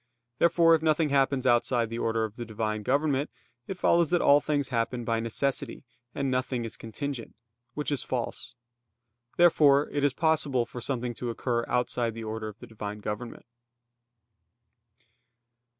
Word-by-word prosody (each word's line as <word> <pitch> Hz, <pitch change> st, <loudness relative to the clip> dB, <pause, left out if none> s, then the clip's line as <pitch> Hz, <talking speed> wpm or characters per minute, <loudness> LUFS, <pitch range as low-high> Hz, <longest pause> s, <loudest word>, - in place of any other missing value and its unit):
Therefore, 170 Hz, 0 st, +5 dB
if 160 Hz, -, +3 dB
nothing 155 Hz, -1 st, +2 dB
happens 135 Hz, -1 st, +2 dB
outside 120 Hz, -1 st, +2 dB
the 115 Hz, -, -3 dB
order 115 Hz, 0 st, 0 dB
of 110 Hz, -1 st, -4 dB
the 120 Hz, -, -5 dB
Divine 110 Hz, -1 st, -3 dB
government, 140 Hz, +4 st, +1 dB, 0.4 s
it 190 Hz, -, -5 dB
follows 170 Hz, -3 st, +3 dB
that 175 Hz, -, +2 dB
all 145 Hz, -2 st, +5 dB
things 145 Hz, -3 st, -1 dB
happen 120 Hz, 0 st, -1 dB
by 115 Hz, 0 st, 0 dB
necessity, 130 Hz, +5 st, -3 dB, 0.3 s
and 140 Hz, -1 st, -1 dB
nothing 125 Hz, -2 st, -1 dB
is 115 Hz, -, -6 dB
contingent; 125 Hz, +2 st, -6 dB, 0.4 s
which 150 Hz, 0 st, -2 dB
is 145 Hz, -, 0 dB
false. 125 Hz, 0 st, -4 dB, 0.8 s
Therefore 150 Hz, -4 st, +5 dB
it 145 Hz, -, -1 dB
is 145 Hz, -2 st, +3 dB
possible 145 Hz, -6 st, +1 dB
for 120 Hz, -, -8 dB
something 125 Hz, -1 st, -2 dB
to 120 Hz, +1 st, -5 dB
occur 120 Hz, 0 st, -1 dB
outside 120 Hz, -2 st, 0 dB
the 115 Hz, -, -6 dB
order 110 Hz, 0 st, -4 dB
of 105 Hz, -1 st, -9 dB
the -, -, -11 dB
Divine 105 Hz, -2 st, -6 dB
government. 105 Hz, +3 st, -6 dB
125 Hz, 155 wpm, -28 LUFS, 115-145 Hz, 0.8 s, Therefore